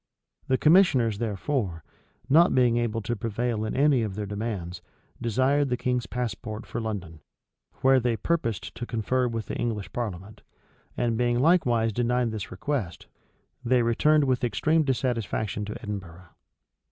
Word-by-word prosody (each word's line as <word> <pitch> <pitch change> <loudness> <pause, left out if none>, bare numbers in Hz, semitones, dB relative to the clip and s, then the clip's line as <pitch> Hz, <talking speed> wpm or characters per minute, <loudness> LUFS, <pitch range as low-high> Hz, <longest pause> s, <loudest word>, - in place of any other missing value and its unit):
The 130 - +2
commissioners, 135 - +4
therefore, 105 - -2 0.4
not 165 +6 +5
being 125 -2 +4
able 115 -2 -1
to 120 +1 -2
prevail 115 +1 -2
in 110 - -3
any 140 -2 +4
of 105 -4 -3
their 105 0 -3
demands, 100 -4 -4 0.4
desired 130 +4 +2
the 125 - 0
king's 125 -1 -1
passport 115 -2 -4
for 120 - -4
London, 95 -8 -5 0.6
where 135 0 +5
they 120 -2 0
purposed 115 - -2
to 120 - -6
confer 125 +3 0
with 115 -2 -3
the - - -5
English 110 -4 -3
parliament;[*] 105 -3 -5 0.6
and 115 -1 0
being 120 0 +2
likewise 120 -7 +3
denied 120 +1 +1
this 110 -3 -5
request, 140 - -3 0.6
they 125 0 +3
returned 150 +6 +3
with 130 -2 0
extreme 155 +8 +2
dissatisfaction 115 -6 -1
to 105 - -6
Edinburgh. 90 -5 -7
120 Hz, 145 wpm, -26 LUFS, 105-130 Hz, 0.6 s, not